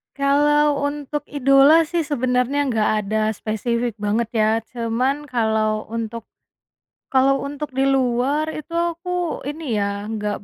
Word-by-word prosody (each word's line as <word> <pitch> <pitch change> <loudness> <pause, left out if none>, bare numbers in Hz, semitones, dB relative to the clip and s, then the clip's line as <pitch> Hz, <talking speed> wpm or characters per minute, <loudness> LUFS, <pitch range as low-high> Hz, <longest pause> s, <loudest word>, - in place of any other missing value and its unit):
Kalau 290 +1 +3
untuk 290 0 -4
idola 275 +3 +5
sih 335 -3 -1
sebenarnya 260 0 0
gak 220 -3 +1
ada 215 +2 -1
spesifik 230 +2 -2
banget 210 +2 -1
ya 215 -2 +2 0.2
cuman 250 +5 -1
kalau 220 -4 0
untuk, 230 0 -5 0.8
kalau 270 +1 +3
untuk 290 0 -6
di 270 +1 +1
luar 270 +4 +1
itu 310 +2 -7
aku 345 0 -2
ini 290 -8 -3
ya 200 0 -2
nggak 210 -2 -3
260 Hz, 125 wpm, -21 LUFS, 225-295 Hz, 0.8 s, idola